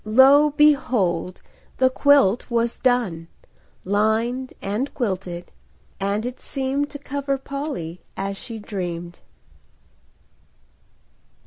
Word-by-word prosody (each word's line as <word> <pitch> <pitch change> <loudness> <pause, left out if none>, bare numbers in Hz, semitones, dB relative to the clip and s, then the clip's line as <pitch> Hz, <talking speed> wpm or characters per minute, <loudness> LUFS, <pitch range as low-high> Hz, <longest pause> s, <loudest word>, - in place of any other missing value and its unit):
Lo, 270 +7 +6
behold! 250 - +2 0.4
the 260 - +5
quilt 265 -6 +4
was 235 0 0
done,— 225 -11 +1 0.6
Lined 220 +6 0
and 215 +8 -2
quilted,—and 180 - -4
it 250 +1 -5
seemed 275 +2 -2
To 290 - -7
cover 280 0 -2
Polly 270 - -5 0.2
as 195 0 -3
she 225 +3 -6
dreamed! 175 -5 -5
230 Hz, 90 wpm, -23 LUFS, 185-270 Hz, 0.6 s, Lo